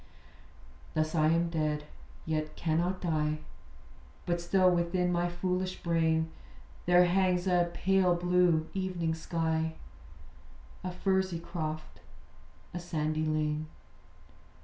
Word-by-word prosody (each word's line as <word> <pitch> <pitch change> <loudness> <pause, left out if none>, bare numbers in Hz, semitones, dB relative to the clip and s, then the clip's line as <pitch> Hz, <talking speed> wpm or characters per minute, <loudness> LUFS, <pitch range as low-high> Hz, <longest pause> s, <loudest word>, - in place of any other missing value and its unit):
Thus 155 0 +1
am 155 -1 +3
I - - +3
dead: 155 -3 0 0.4
yet 155 -1 -2
cannot 175 +3 0
die: 155 -3 0 0.9
But 175 0 0
still 185 +1 +4
within 180 +1 +1
my 175 0 +1
foolish 185 +1 -2
brain 160 -1 +1 0.6
There 180 0 +6
hangs 180 0 +2
a 175 -2 +3
pale 185 -1 +3
blue 175 -2 +3
evening 185 -4 -1
sky; 160 0 -1 1.1
A 185 - -2
furzy 190 -1 0
croft; 155 -2 -5 0.7
a 175 - -3
sandy 155 -2 -1
lane. 155 0 0
170 Hz, 105 wpm, -31 LUFS, 160-180 Hz, 1.1 s, There